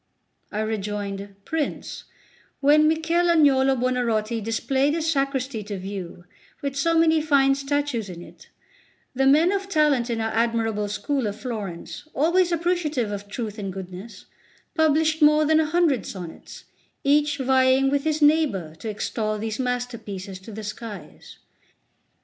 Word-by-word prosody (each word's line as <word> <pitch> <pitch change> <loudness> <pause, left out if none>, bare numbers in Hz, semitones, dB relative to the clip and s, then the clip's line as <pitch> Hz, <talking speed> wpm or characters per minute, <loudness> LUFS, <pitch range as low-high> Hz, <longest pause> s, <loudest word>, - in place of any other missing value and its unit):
I 210 - -2
rejoined: 205 -2 -4
"Prince, 320 -3 -3 0.5
when 300 +2 +5
Michel 325 +2 +1
Agnolo 270 -5 +4
Buonarroti 235 -3 0
displayed 265 +6 0
his 325 -1 0
Sacristy 275 -4 -1
to 205 -1 -5
view, 185 -2 -7 0.4
with 280 -1 -2
so 330 +4 +2
many 320 -1 +4
fine 280 -3 +4
statues 275 -5 -2
in 175 -1 -8
it, - - -16 0.6
the 270 +1 +2
men 310 +6 +5
of 395 -1 -2
talent 300 -8 +2
in 230 -1 -1
our 225 0 -1
admirable 225 -2 0
school 215 +5 -1
of 205 +1 -5
Florence, 215 - -6
always 345 +5 +3
appreciative 330 -9 0
of 205 0 -5
truth 215 0 -5
and 195 -2 -4
goodness, 190 +2 -9 0.5
published 315 0 +2
more 300 +1 +5
than 315 +1 +4
a 315 - +2
hundred 330 -6 +2
sonnets, 175 -4 -9 0.4
each 290 +1 +3
vying 265 0 +3
with 285 -1 +1
his 310 -1 0
neighbour 290 - +2
to 225 - -5
extol 215 0 -2
these 220 +1 -4
masterpieces 235 -7 -4
to 190 +4 -11
the 215 +1 -7
skies. 210 -3 -9
260 Hz, 145 wpm, -24 LUFS, 210-300 Hz, 0.6 s, when